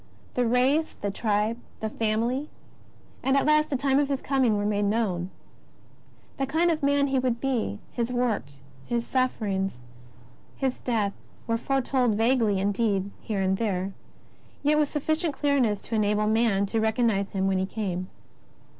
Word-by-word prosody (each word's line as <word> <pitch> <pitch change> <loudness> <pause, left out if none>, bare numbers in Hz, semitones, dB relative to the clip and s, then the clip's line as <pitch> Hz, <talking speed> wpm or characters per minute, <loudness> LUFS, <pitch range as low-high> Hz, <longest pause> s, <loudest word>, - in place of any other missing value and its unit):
The 245 -1 +1
race, 265 +7 +2
the 205 - -1
tribe, 215 +2 0 0.2
the 220 - -2
family, 230 +7 0 0.7
and 270 +1 +2
at - - +2
last 305 0 +4
the 280 - 0
time 275 +1 +2
of 290 -1 +1
His 275 -2 0
Coming, 260 -7 +2
were 205 - -1
made 205 0 +1
known. 200 -5 0 1.1
The 270 - -1
kind 330 +5 +2
of 315 -1 -1
man 280 0 +3
He 270 -1 +1
would 250 -2 0
be. 245 -6 -1
His 235 0 -2
work. 245 - 0 0.4
His 235 -1 -1
sufferings, 200 - -1 0.8
His 265 -2 -1
death, 215 -5 0 0.3
were 230 - 0
foretold 260 -3 +1
vaguely 225 -3 +2
indeed, 200 0 0
here 205 -3 -2
and 190 0 +1
there, 195 -3 -1 0.7
yet 300 +1 +3
with 295 -2 +1
sufficient 315 +1 -1
clearness 265 -8 +2
to - - -9
enable 210 -1 +2
man 215 -2 +2
to 220 +3 -1
recosrnize 220 -3 +1
Him 190 -1 0
when 190 -1 +2
He 190 - -1
came. 185 -3 -3
230 Hz, 160 wpm, -26 LUFS, 205-270 Hz, 1.1 s, last